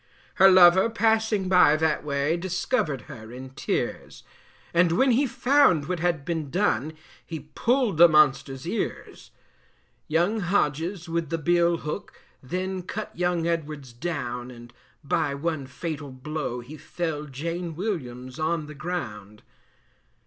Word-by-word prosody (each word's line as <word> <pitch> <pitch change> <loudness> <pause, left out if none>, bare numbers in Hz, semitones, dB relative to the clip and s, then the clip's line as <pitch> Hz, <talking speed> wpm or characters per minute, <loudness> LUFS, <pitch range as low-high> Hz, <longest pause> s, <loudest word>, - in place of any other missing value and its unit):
Her 195 - +10
lover 185 +2 +7
passing 220 -3 +1
by 180 -5 +6
that 155 0 0
way, 145 +2 0
Discovered 175 - -1
her 110 0 -11
in 130 +1 -9
tears, 130 - -3 0.5
And 170 0 +4
when 260 +9 +3
he 270 +4 +3
found 245 - +3
what 180 -2 -2
had 170 -4 0
been 160 -4 -3
done 160 -3 0 0.3
He 155 -2 -8
pulled 245 - +1
the 170 +1 +9
monster's 140 -2 +2
ears. 220 - -4 0.8
Young 175 +8 +1
Hodges 175 -1 -1
with 165 -2 -2
the 165 - -1
bill 170 +2 +2
hook, 155 +6 -6 0.2
Then 185 +7 -3
cut 210 +4 -6
young 175 -1 0
Edwards 155 -6 -3
down: 125 -4 -4
And 120 -1 -12 0.3
by 140 0 0
one 150 -2 -3
fatal 145 +1 -5
blow 130 -1 -4
he 145 +6 -11
felled 150 -3 -4
Jane 165 +4 -4
Williams 130 - -5
on 155 0 -1
the 150 - -9
ground. 110 - -6
165 Hz, 135 wpm, -25 LUFS, 140-180 Hz, 0.8 s, Her